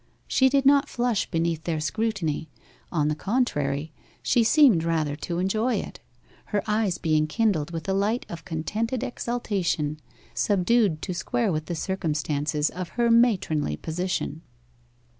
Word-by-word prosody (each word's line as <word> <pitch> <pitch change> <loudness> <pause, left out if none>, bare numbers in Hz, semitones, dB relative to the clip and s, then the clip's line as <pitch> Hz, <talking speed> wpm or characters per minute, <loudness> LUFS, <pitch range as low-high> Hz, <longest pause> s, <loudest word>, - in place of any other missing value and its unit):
She 265 0 +4
did 275 0 +2
not 280 +1 +5
flush 240 -3 0
beneath 165 -1 -1
their 165 -2 -1
scrutiny; 165 -2 -2 0.4
on 150 -4 +1
the 150 - +1
contrary, 150 - -1 0.3
she 240 - +3
seemed 235 - +5
rather 160 -3 0
to 170 +3 -4
enjoy 215 +7 +1
it, - - -5 0.5
her 205 -2 -1
eyes 210 -4 +1
being 155 -1 +1
kindled 180 -4 +1
with 165 0 -6
a 190 - +1
light 205 +5 0
of 165 -1 -8
contented 210 +9 -2
exultation, 190 -12 -2 0.3
subdued 200 -3 +2
to 185 - -3
square 225 +5 -1
with 155 -1 -3
the 175 - -3
circumstances 150 -4 -1
of 180 -1 -5
her 235 -1 +3
matronly 190 - +2
position. 165 - -3
180 Hz, 140 wpm, -25 LUFS, 155-225 Hz, 0.5 s, not